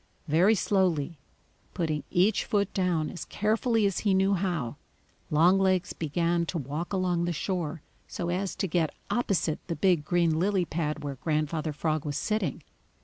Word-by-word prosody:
Very 175 +8 +4
slowly, 175 -6 +1 0.6
putting 155 -4 -1
each 195 +4 +3
foot 200 -1 0
down 175 -5 0
as 175 -5 -6
carefully 220 +1 +1
as 195 -2 +1
he 200 -3 +2
knew 195 +1 +3
how, 175 -10 -1 0.5
Longlegs 185 +3 +3
began 170 +2 0
to 175 - -2
walk 150 +5 -4
along 180 -3 +1
the 175 - 0
shore 170 -2 -3 0.2
so 170 - -4
as 185 +2 -2
to 195 - -1
get 165 -2 0 0.2
opposite 195 -8 0
the 170 - -2
big 180 -5 +2
green 165 -1 +2
lily 190 0 +2
pad 155 -3 -3
where 140 -3 -5
Grandfather 155 0 -1
Frog 155 0 -1
was 145 -2 -3
sitting. 210 - -1
175 Hz, 155 wpm, -28 LUFS, 155-190 Hz, 0.6 s, Very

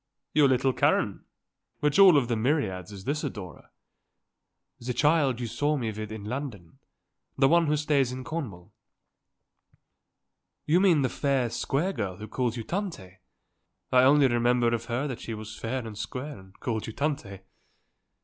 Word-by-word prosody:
"Your 150 -2 +5
little 130 0 +2
Karen? - - +1 0.5
Which 150 +4 +1
of 195 - +10
all 150 -9 +6
the 120 -1 -1
myriads 110 - -1
is 100 -2 -9
this 150 +7 -2
adorer?" 95 - -7 1.1
"The 125 +1 -4
child 145 -5 +3
you 120 - -3
saw 145 +7 0
with 115 -5 -3
me 110 0 -5
in 105 - -8
London. 110 - -6 0.6
The 135 - +5
one 170 +2 +4
who 150 +1 +2
stays 145 -4 +1
in 130 0 -6
Cornwall." 125 - -6 1.9
"You 165 +4 +4
mean 175 -7 +4
the - - +3
fair, 135 -5 0
square 160 +11 -1
girl 100 -7 -4
who 110 - -8
calls 125 -1 -2
you 115 - -4
Tante? 110 - -5 0.7
I 125 - +6
only 140 +1 +6
remember 120 0 +2
of 115 0 -2
her 120 +4 -2
that 125 -4 -6
she 115 - -5
was 110 0 -8
fair 120 +2 -4
and 110 -2 -7
square 130 +6 -6
and 95 0 -18
called 110 -3 -3
you 110 - -6
Tante." 135 -10 -3
125 Hz, 165 wpm, -27 LUFS, 110-145 Hz, 1.9 s, of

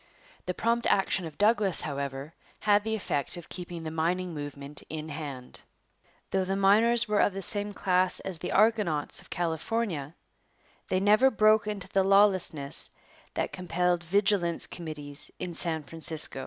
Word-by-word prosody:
The 180 - -2
prompt 235 +1 0
action 190 -2 +1
of 155 - -12
Douglas, 205 -4 +3
however, 140 +1 -4 0.3
had 205 -1 +3
the 220 0 -1
effect 145 -8 -1
of 175 - -10
keeping 175 -2 -6
the 160 - -5
mining 175 +3 -1
movement 145 -1 -6
in 155 0 -5
hand. 140 -4 -7 0.7
Though 190 0 +1
the 190 +1 -2
miners 220 +5 +4
were 210 -1 +1
of 205 - +3
the 195 0 -5
same 205 +2 -1
class 185 -2 +2
as 185 -4 -3
the - - -4
'argonauts' 205 -8 +2
of - - -16
California, 170 -2 -2 0.7
they 185 - +1
never 210 +7 +5
broke 215 -2 +3
into 210 -3 -4
the 195 - +2
lawlessness 190 -7 +3 0.5
that - - -2
compelled 180 -1 0
vigilance 190 -1 +1
committees 150 -4 -6
in 175 - -5
San 160 -2 0
Francisco. 160 -2 -1
180 Hz, 155 wpm, -28 LUFS, 160-205 Hz, 0.7 s, never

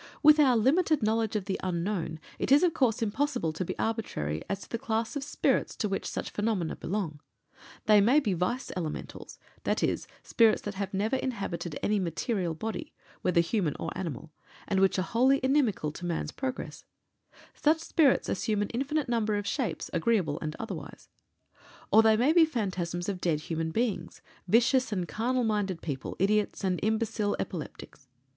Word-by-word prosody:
With 305 0 +8
our 260 -5 +5
limited 305 +4 +3
knowledge 220 0 +1
of 205 -3 -1
the 195 -1 -2
Unknown 175 -2 -2 0.2
it - - -1
is, 285 +5 +7
of 350 -3 +3
course, 245 -6 +1
impossible 215 - -1
to 175 - -3
be - - -5
arbitrary 80 - -2
as 195 0 -2
to - - -11
the 230 - -2
class 225 +2 -2
of 285 - -2
spirits 295 - 0
to 210 - -1
which 195 - -2
such - - -4
phenomena 205 -6 -1
belong. 170 -6 -3 0.7
They 210 -1 +6
may 245 +9 +5
be 215 -10 0
Vice 185 +9 -2
Elementals, 165 -4 -6 0.3
i.e., - - +1 0.3
spirits 225 -2 +3
that 205 - -4
have 200 0 -4
never 210 +7 0
inhabited 195 - -3
any 210 0 +2
material 180 0 -1
body, 225 - -5 0.3
whether 170 -2 +3
human 170 -3 0
or 165 - -4
animal, 160 -4 -5 0.4
and 195 - +1
which 195 0 +3
are 185 - +1
wholly 260 +7 +3
inimical 260 - +2
to 175 +4 -8
man's 165 -3 -2
progress 265 -1 -5 0.7
such 305 +2 +3
spirits 315 -4 +3
assume 205 +2 0
an 205 - -4
infinite 280 +4 -1
number 225 -3 +1
of 205 0 -2
shapes, 250 +2 -2
agreeable 170 -4 +1
and 155 0 -4
otherwise; 225 - -7 0.8
or 220 - +8
they 220 -1 +5
may 260 +7 +3
be 340 -1 +7
phantasms 185 - -2
of 190 -3 -3
dead 155 -4 +1
human 160 0 -2
beings 220 +4 -2 0.2
vicious 250 +5 +3
and 185 -4 -1
carnal 250 +6 0
minded 205 -5 0
people, 140 -5 -4
idiots, 210 +2 +1
and 185 -2 0
imbecile 220 -1 0
epileptics. 150 -5 -7
210 Hz, 170 wpm, -29 LUFS, 180-240 Hz, 0.8 s, With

